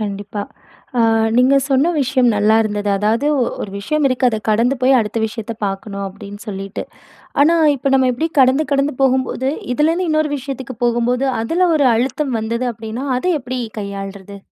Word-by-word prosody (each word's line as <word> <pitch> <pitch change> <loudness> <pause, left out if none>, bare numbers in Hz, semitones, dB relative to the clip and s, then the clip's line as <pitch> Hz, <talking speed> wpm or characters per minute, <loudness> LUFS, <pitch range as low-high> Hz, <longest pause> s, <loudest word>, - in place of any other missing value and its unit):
கண்டிப்பா. 205 0 -4 0.6
ஆ - - +4 0.4
நீங்க 260 +3 +5
சொன்ன 275 +5 +3
விஷயம் 255 -2 +2
நல்லா 210 +2 +3
இருந்தது. 205 -1 -2
அதாவது 220 +7 +1 0.3
ஒரு 200 - -5
விஷயம் 305 +9 -1
இருக்கு 255 0 +1
அத 220 -2 -1
கடந்து 230 +5 +2
போய் 260 +1 +5
அடுத்த 215 +1 -3
விஷயத்த 225 0 -6
பார்க்கணும், 195 +1 -5
அப்பிடின்னு 200 +2 -10
சொல்லிட்டு. 195 -1 -5 0.6
ஆனா, 335 +3 +4 0.2
இப்ப 275 +1 -1
நம்ம 260 -1 +3
இப்பிடி 315 +7 -1
கடந்து, 265 +4 +4
கடந்து 280 +1 +1
போகும்போது 260 0 +1 0.2
இதிலேருந்து 330 +5 +1
இன்னொரு 310 -1 +1
விஷயத்துக்கு 265 -2 -7
போகும்போது 240 +2 +1 0.2
அதுல 350 +9 +1
ஒரு 285 -3 +3
அழுத்தம் 260 +1 -1
வந்தது 230 +3 -2
அப்பிடின்னா, 225 +3 -6
அதை 365 +6 0
எப்பிடி 255 0 -4 0.2
கையாள்றது? 200 0 -7
245 Hz, 155 wpm, -18 LUFS, 210-270 Hz, 0.6 s, நீங்க